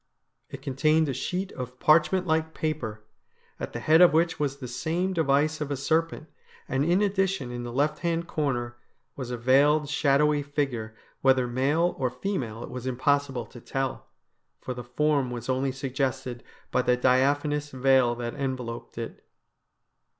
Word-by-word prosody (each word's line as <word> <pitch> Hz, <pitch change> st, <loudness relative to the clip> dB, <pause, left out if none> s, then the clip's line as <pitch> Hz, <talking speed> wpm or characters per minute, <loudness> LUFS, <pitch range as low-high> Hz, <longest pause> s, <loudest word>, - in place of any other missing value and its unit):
It 140 Hz, -1 st, -9 dB
contained 155 Hz, +3 st, +2 dB
a -, -, -1 dB
sheet 185 Hz, +8 st, -3 dB
of 125 Hz, 0 st, -7 dB
parchment 170 Hz, +4 st, +4 dB
like 160 Hz, -1 st, 0 dB
paper, 110 Hz, -9 st, -3 dB, 0.6 s
at -, -, -5 dB
the 120 Hz, -, -5 dB
head 155 Hz, +7 st, +5 dB
of 180 Hz, -, +7 dB
which 165 Hz, +1 st, +2 dB
was 140 Hz, -2 st, -1 dB
the 130 Hz, -3 st, -7 dB
same 165 Hz, +9 st, -1 dB
de 170 Hz, -, +1 dB
vice 150 Hz, +2 st, +2 dB
of 150 Hz, -, -2 dB
a 140 Hz, -, -2 dB
serpent, 160 Hz, +3 st, 0 dB, 0.4 s
and 135 Hz, +1 st, 0 dB
in 175 Hz, +6 st, +3 dB
addition, 190 Hz, -9 st, 0 dB
in 120 Hz, 0 st, -5 dB
the 120 Hz, 0 st, -5 dB
left 145 Hz, +4 st, 0 dB
hand 170 Hz, -1 st, -1 dB
corner, 120 Hz, -7 st, -2 dB, 0.4 s
was 130 Hz, -3 st, -6 dB
a 125 Hz, -, -3 dB
veiled, 145 Hz, +5 st, +4 dB
shadowy 150 Hz, 0 st, +3 dB
figure, 135 Hz, -6 st, -3 dB, 0.3 s
whether 130 Hz, -1 st, +4 dB
male 145 Hz, +8 st, +1 dB
or 130 Hz, -2 st, +1 dB
female 125 Hz, -, -4 dB
it -, -, -8 dB
was 125 Hz, 0 st, -5 dB
impossible 135 Hz, -1 st, 0 dB
to 120 Hz, +2 st, -13 dB
tell, 135 Hz, +2 st, -3 dB, 0.5 s
for 130 Hz, -, -5 dB
the 125 Hz, 0 st, -7 dB
form 140 Hz, +1 st, +1 dB
was 120 Hz, 0 st, -6 dB
only 130 Hz, +1 st, +1 dB
suggested 130 Hz, -2 st, -3 dB, 0.3 s
by -, -, +2 dB
the 125 Hz, 0 st, +2 dB
diaphanous 145 Hz, +4 st, +2 dB
veil 130 Hz, -2 st, +3 dB
that 120 Hz, 0 st, -4 dB
enveloped 125 Hz, -5 st, -5 dB
it. 115 Hz, -1 st, -6 dB
135 Hz, 165 wpm, -27 LUFS, 125-155 Hz, 0.6 s, of